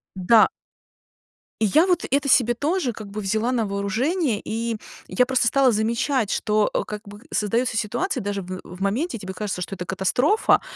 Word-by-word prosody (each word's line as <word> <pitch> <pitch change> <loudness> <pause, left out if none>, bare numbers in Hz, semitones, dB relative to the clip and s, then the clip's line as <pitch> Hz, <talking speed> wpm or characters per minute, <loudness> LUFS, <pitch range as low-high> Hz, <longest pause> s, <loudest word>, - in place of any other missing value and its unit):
Да. 210 +4 +5 1.1
И - - +4
я 310 - +4
вот 360 - +1
это 280 0 +1
себе 240 -2 +5
тоже 290 0 -1
как 215 -2 -9
бы 205 +2 -6
взяла 215 +5 0
на 235 -3 0
вооружение, 220 - -1
и 230 0 -2 0.3
я 250 - +2
просто 250 -2 +1
стала 270 +1 +4
замечать, 230 +2 0
что, 215 0 +1
э, - - 0
как 210 -1 -6
бы 205 +1 -11
создается 230 +4 0
ситуация, 235 - -1
даже 200 0 -3
в 185 +1 -6
в 180 +2 -11
моменте 230 - -1
тебе 190 -2 -7
кажется, 190 -2 -4
что 190 - -5
это 180 -1 -6
катастрофа, 245 - +2
220 Hz, 180 wpm, -23 LUFS, 200-255 Hz, 1.1 s, Да